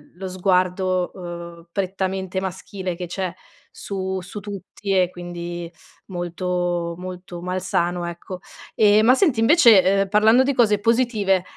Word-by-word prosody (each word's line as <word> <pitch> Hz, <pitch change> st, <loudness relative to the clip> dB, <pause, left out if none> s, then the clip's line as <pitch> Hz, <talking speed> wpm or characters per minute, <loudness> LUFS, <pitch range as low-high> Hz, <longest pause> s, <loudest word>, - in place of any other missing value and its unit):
l -, -, -26 dB
lo 190 Hz, 0 st, -5 dB
sguardo, 185 Hz, 0 st, +1 dB
uhm, 170 Hz, -1 st, -8 dB
prettamente 190 Hz, -1 st, -2 dB
maschile 190 Hz, -1 st, -5 dB
che 180 Hz, 0 st, -5 dB
c'è 185 Hz, -1 st, -3 dB, 0.4 s
su 190 Hz, -1 st, -4 dB
su 195 Hz, +3 st, -8 dB
tutti, 200 Hz, 0 st, -5 dB
e 180 Hz, -1 st, +3 dB
quindi 175 Hz, -1 st, -6 dB, 0.3 s
molto 175 Hz, -1 st, -2 dB
molto 180 Hz, -1 st, -8 dB
malsano, 180 Hz, -1 st, -1 dB
ecco. 175 Hz, +2 st, -7 dB, 0.4 s
Ehm, 215 Hz, +1 st, +5 dB
ma 250 Hz, -, +7 dB
senti 265 Hz, -, +2 dB
invece, 220 Hz, -, +6 dB
uhm, 195 Hz, -, -8 dB
parlando 220 Hz, +5 st, +5 dB
di 280 Hz, +1 st, +1 dB
cose 210 Hz, -5 st, +3 dB
positive, 220 Hz, -5 st, +2 dB
185 Hz, 135 wpm, -22 LUFS, 175-200 Hz, 0.4 s, ma